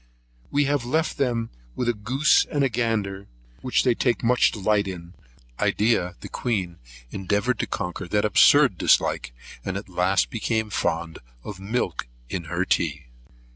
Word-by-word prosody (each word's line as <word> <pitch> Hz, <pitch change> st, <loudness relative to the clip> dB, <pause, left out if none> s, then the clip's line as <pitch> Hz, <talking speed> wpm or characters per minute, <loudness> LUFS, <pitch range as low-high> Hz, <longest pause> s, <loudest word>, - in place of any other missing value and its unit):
We 145 Hz, 0 st, +2 dB
have 140 Hz, -2 st, 0 dB
left 155 Hz, +7 st, -1 dB
them 120 Hz, -4 st, 0 dB, 0.3 s
a 120 Hz, -1 st, +1 dB
goose 125 Hz, +8 st, +3 dB
and 145 Hz, -2 st, -1 dB
a 135 Hz, -, +2 dB
gander, 105 Hz, -4 st, -2 dB, 0.3 s
which 125 Hz, -, +1 dB
they 125 Hz, -, +3 dB
take 120 Hz, +1 st, 0 dB
a -, -, -1 dB
great 125 Hz, +1 st, +4 dB
delight 105 Hz, -1 st, +1 dB
in. 85 Hz, -2 st, -8 dB, 0.5 s
Edea, 105 Hz, -5 st, +1 dB
the -, -, -7 dB
Queen, 95 Hz, -8 st, -3 dB, 0.3 s
endeavoured 100 Hz, +6 st, -1 dB
to -, -, -1 dB
conquer 90 Hz, 0 st, -4 dB
that 105 Hz, +4 st, +1 dB
absurd 105 Hz, -, +5 dB
dislike, -, -, +2 dB, 0.3 s
and 95 Hz, 0 st, -3 dB
at 100 Hz, -, -7 dB
last 90 Hz, +2 st, +1 dB
became 110 Hz, -1 st, -1 dB
fond 80 Hz, -2 st, -2 dB, 0.2 s
of 100 Hz, -3 st, -8 dB
milk 95 Hz, -, -2 dB, 0.2 s
in 85 Hz, -3 st, -4 dB
her 85 Hz, +3 st, -1 dB
tea. 75 Hz, -7 st, -1 dB
105 Hz, 155 wpm, -24 LUFS, 90-120 Hz, 0.5 s, absurd